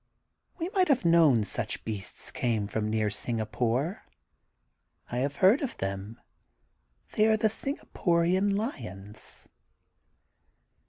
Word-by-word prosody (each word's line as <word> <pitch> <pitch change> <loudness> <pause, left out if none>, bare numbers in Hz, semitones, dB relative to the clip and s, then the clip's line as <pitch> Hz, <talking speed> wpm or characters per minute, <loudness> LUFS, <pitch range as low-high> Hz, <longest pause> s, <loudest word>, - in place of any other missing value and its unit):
We 335 - -2
might 375 -2 +2
have 265 - +2
known 160 -9 +5
such 100 - -3
beasts 105 -4 -4
came 115 -4 0
from 110 +1 -2
near 110 -1 +1
Singapore. 120 - -1 1.1
I 120 - -2
have 140 +2 -1
heard 195 +9 +5
of 275 - -3
them. 100 +4 -4 0.9
They 215 0 +3
are 220 0 +4
the 220 0 +2
Singaporian 190 -6 0
Kons. 110 - -6
130 Hz, 110 wpm, -29 LUFS, -, 1.1 s, known